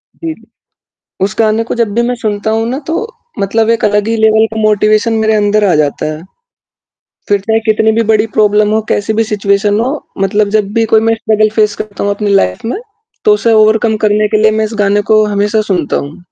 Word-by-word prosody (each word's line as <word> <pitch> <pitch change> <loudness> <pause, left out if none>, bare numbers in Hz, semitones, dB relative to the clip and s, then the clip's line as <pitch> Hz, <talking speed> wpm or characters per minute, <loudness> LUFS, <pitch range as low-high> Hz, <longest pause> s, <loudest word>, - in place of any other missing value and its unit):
जी, 325 -2 -5
जी। 225 - -21 0.8
उस 195 - -2
गाने 220 0 +2
को 235 - -5
जब 230 -3 0
भी 235 - +1
मैं 245 - -1
सुनता 220 -1 -3
हूँ 225 +1 -1
ना 265 +3 -3
तो 325 - -1 0.4
मतलब 220 +3 0
एक 230 - 0
अलग 210 +1 +1
ही 225 - 0
लेवल 220 0 +3
का - - -5
मोटिवेशन 215 +1 +2
मेरे 220 0 +1
अंदर 210 0 +1
आ 180 - +2
जाता 150 -2 -1
है। 155 - -9 1.1
फ़िर 205 -1 +2
चाहे 220 +2 0
कितनी 220 0 +2
भी 230 +1 +1
बड़ी 215 +1 +2
प्रॉब्लम 210 0 +3
हो, 220 - +1
कैसी 205 +2 -1
भी 225 +1 +1
सिचुएशन 205 -1 0
में 215 - +1
हो, 280 +4 -4
मतलब 205 +1 +1
जब 205 -1 -2
भी 225 -1 +1
कोई 220 - +5
मैं 225 0 +1
स्ट्रगल 215 -1 +1
फेस 210 -1 +2
करता 205 -2 -6
हूँ 200 - 0
अपनी 205 -1 -2
लाइफ़ 90 - 0
में 320 - -3 0.5
तो 425 - +5
उसे 235 - +1
ओवरकम 220 0 +3
करने 210 0 +2
के 215 - 0
लिए 220 0 +4
मैं 220 0 0
इस 220 - -6
गाने 205 0 +2
को 215 0 +5
हमेशा 210 +1 0
सुनता 175 -5 -1
हूँ। 145 +5 -7
215 Hz, 225 wpm, -12 LUFS, 205-225 Hz, 1.1 s, कोई